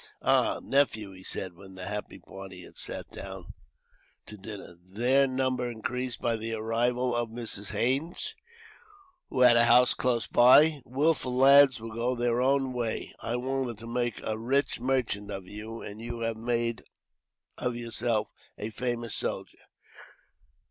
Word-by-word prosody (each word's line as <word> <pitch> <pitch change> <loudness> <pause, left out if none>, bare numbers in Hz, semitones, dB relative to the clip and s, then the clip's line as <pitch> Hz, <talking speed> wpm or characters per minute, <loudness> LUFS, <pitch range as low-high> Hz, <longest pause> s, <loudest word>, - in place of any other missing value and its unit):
"Ah! - - +3
Nephew," 110 -7 +1
he 95 0 -13
said, 95 -1 -4
when 95 +1 -13
the 90 0 -6
happy 105 +1 -5
party 95 -1 -10
had - - -15
sat - - -6
down - - -8 0.7
to 105 - -10
dinner, 100 -3 -9
their 120 +9 +2
number 130 -1 -1
increased 125 +2 -4
by 115 -1 0
the 115 +1 -4
arrival 120 +3 0
of 120 -1 -1
Mrs. 110 -3 -4
Haines, 135 +8 -1 1.0
who 130 - -1
had 125 -1 +8
a 120 0 +6
house 120 +1 +6
close 120 -2 0
by; 145 +5 +6
"wilful 135 -1 +1
lads 135 0 +7
will 115 0 -8
go 120 +3 0
their 120 0 +1
own 135 0 +2
way. 120 -3 -3
I 115 - -3
wanted 130 -2 -2
to 115 - -10
make 120 -1 -2
a 110 0 -2
rich 135 +4 0
merchant 120 -5 -1
of 95 -2 -5
you, 110 +3 -8
and 105 +2 -8
you 120 0 -5
have 115 0 -1
made 115 0 -1 0.8
of 125 -1 -1
yourself 115 -1 -1 0.3
a 110 +2 -5
famous 120 0 -3
soldier. - - -4
120 Hz, 155 wpm, -28 LUFS, 110-125 Hz, 1.0 s, had